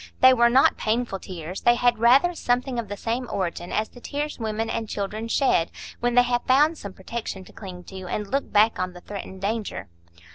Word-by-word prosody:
They 260 0 +8
were 235 -1 +5
not 260 +3 +4
painful 220 -2 -1
tears; 180 0 -7
they 240 - +5
had 240 -1 +2
rather 265 +10 +5
something 250 -4 -1
of 230 - -4
the 205 +1 -6
same 235 +3 -3
origin 175 -2 -3
as 215 - 0
the 245 - -15
tears 295 +2 -4
women 220 0 -2
and 225 -1 -3
children 210 +3 -3
shed 230 - +2 0.3
when 240 0 0
they 245 - +7
have 245 0 0
found 295 +5 +4
some 200 -2 -7
protection 195 0 -6
to - - -16
cling 185 -4 -9
to 185 0 -9
and 210 +3 -2
look 275 +6 -2
back 215 0 +4
on 185 0 -2
the 180 - -12
threatened 190 -1 -8
danger. 210 - -3
225 Hz, 210 wpm, -24 LUFS, 195-245 Hz, 0.3 s, They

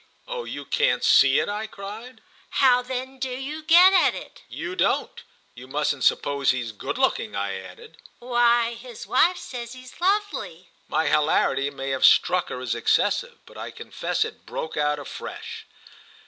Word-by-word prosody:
"Oh, 485 -1 -5
you - - -7
can't - - +1
'see' - - +6
it!" - - +1
I 210 +2 -3
cried. 220 +4 -10 0.3
"How 250 -2 +4
then 260 +1 -6
do 260 0 -2
you 270 +5 -5
get 350 +4 +7
at 375 - +4
it?" - - -10
"You 360 - -5
don't! - - 0 0.3
You 125 +2 -12
mustn't 145 0 -1
suppose 140 -1 +2
he's 125 -3 0
good 105 - -5
looking," - - 0
I 100 0 -2
added. 95 - -13 0.2
"Why 240 -1 +2
his 235 -1 -10
wife 345 +8 +3
says 240 -5 -7
he's 255 +4 -13
lovely!" 380 - -1 0.2
My 160 - 0
hilarity 140 -2 +2
may 135 -1 -5
have 135 - -2
struck 180 0 +4
her 125 - -5
as 125 -3 -2
excessive, 120 - +1
but - - -13
I - - -5
confess - - -3
it - - -11
broke 160 - -5
out 150 0 +1
afresh. 145 - -8
230 Hz, 165 wpm, -24 LUFS, -, 0.3 s, get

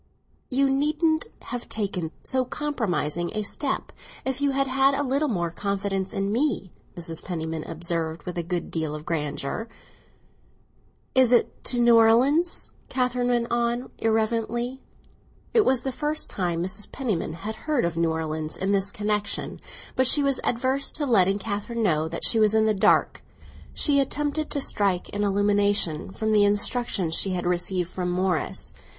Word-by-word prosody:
"You 275 +1 +2
needn't 305 +4 +1 0.2
have 245 -1 -6
taken 195 -6 -2
so 260 -1 +2
compromising 200 - -2
a 215 - -1
step 270 +7 -2 0.3
if 265 +1 -2
you 285 - +3
had 275 0 +1
had 270 +1 +3
a 285 - 0
little 280 +3 +1
more 175 - -1
confidence 195 0 -2
in 195 +1 -1
me," 240 - 0 0.3
Mrs. 165 -1 -3
Penniman 160 -3 -4
observed, 165 -1 -3
with 180 - -6
a 175 - -1
good 170 +1 -4
deal 160 -2 -2
of 150 0 -8
grandeur. 150 +5 -3 1.5
"Is 260 -2 +5
it 240 - +2
to 245 - 0
New 235 -1 +6
Orleans?" 260 +10 +3 0.2
Catherine 250 -1 0
went 240 -1 0
on 240 +1 0
irrelevantly. 230 +3 0 0.7
It 450 -3 +5
was 260 -2 +3
the 265 - -2
first 300 +3 -1
time 175 -3 -1
Mrs. 190 +3 -3
Penniman 215 - -2
had 205 +7 -5
heard 290 - +2
of 170 -1 -2
New 165 0 +1
Orleans 155 -1 -3
in 190 +1 -1
this 200 0 +2
connexion; 210 0 -2 0.4
but 260 0 +3
she 290 +3 +6
was 275 -2 +1
averse 260 +3 +1
to 300 - 0
letting 195 -6 +4
Catherine 210 +3 -3
know 160 -5 +2
that - - -2
she 225 - +5
was 215 0 +4
in 220 0 +4
the 215 - +3
dark. 195 - +3 0.5
She 285 -2 +3
attempted 295 +2 -1
to 285 - -2
strike 195 -7 0
an 205 0 -1
illumination 200 -4 +1
from 220 +2 -2
the 210 -1 +5
instructions 205 -3 +1
she 190 +3 +3
had 175 -1 -2
received 180 0 0
from 180 -1 -2
Morris. 180 -2 -1
215 Hz, 165 wpm, -25 LUFS, 180-260 Hz, 1.5 s, New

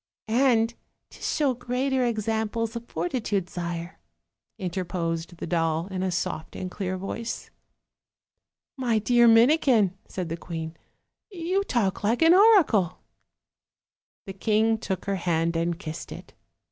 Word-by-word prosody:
"And 230 -1 +3 0.4
to - - -15
show 285 -4 +1
greater 255 +2 -1
examples 225 0 -1
of 235 0 -6
fortitude, 190 +1 -2
sire," 170 0 -5 0.6
interposed 170 -2 -3
the - - -5
doll, 165 -1 0
in 185 -1 -3
a 190 - 0
soft 165 -2 -3
and 185 -1 -5
clear 185 -1 -3
voice. 225 +5 -5 1.3
"My 240 -4 +1
dear 240 +2 +4
Minikin," 230 - +5
said 180 -3 -5
the 165 - -3
queen, 165 -1 -6 0.5
"you 370 +1 -1
talk 210 - 0
like 230 +8 +2
an 325 +1 +7
oracle." 360 - +5 1.3
The 195 - -6
king 220 +3 +2
took 190 -4 -4
her 195 -1 -1
hand 170 -1 0
and 165 0 0
kissed 160 -4 -7
it. - - -10
205 Hz, 130 wpm, -26 LUFS, 175-240 Hz, 1.3 s, an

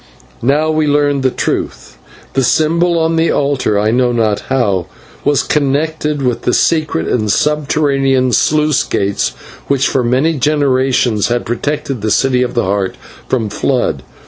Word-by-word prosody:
Now 150 +5 +1
we 155 -1 +1
learned 145 -1 +1
the 130 - +2
truth. - - -4 0.3
The 135 - +1
symbol 170 +6 +2
on 165 0 +1
the 165 +1 +2
altar 140 -7 0
I 105 +1 +1
know 125 +1 +2
not 110 -3 0
how 100 -9 0 0.4
was 145 -1 +2
connected 150 0 -1
with 125 -1 0
secret 160 0 +1
and 110 -4 0
subterranean 140 -2 +1
sluice 150 +2 +2
gates 100 0 -1 0.4
which 140 -1 +1
for 130 - 0
many 130 +7 +1
generations 130 -6 +1
had 120 0 -1
protected 135 +1 -3
the 110 - -1
City 125 +3 +2
of 125 0 -2
the 120 - +1
Heart 95 0 -1 0.3
from 120 -4 -1
flood. 110 - -1
135 Hz, 145 wpm, -14 LUFS, 120-150 Hz, 0.4 s, the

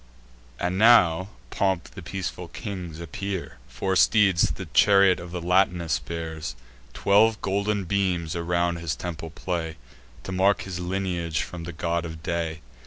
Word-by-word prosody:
And 90 +2 -1
now 110 -8 +6
in 95 - -8 0.2
pomp 95 -3 0
the - - -9
peaceful 90 -2 -5
kings 90 -5 -6
appear: 95 +2 -5
Four 95 -1 -2
steeds 95 -2 +4
the - - -6
chariot 100 -2 +5
of 85 0 -9
Latinus 90 -2 +1
bear; 80 -1 -6 0.5
Twelve 105 +2 +4
golden 100 +1 0
beams 90 -3 -1
around 85 0 0
his 85 -2 -3
temples 80 -2 -6
play, 85 -4 -3 0.5
To - - -6
mark 95 +2 +2
his 90 -2 -5
lineage 90 -3 -2
from 85 -2 -7
the 85 - -5
God 85 +1 -1
of 80 -1 -8
Day. 80 -2 -2
90 Hz, 145 wpm, -25 LUFS, 85-95 Hz, 0.5 s, now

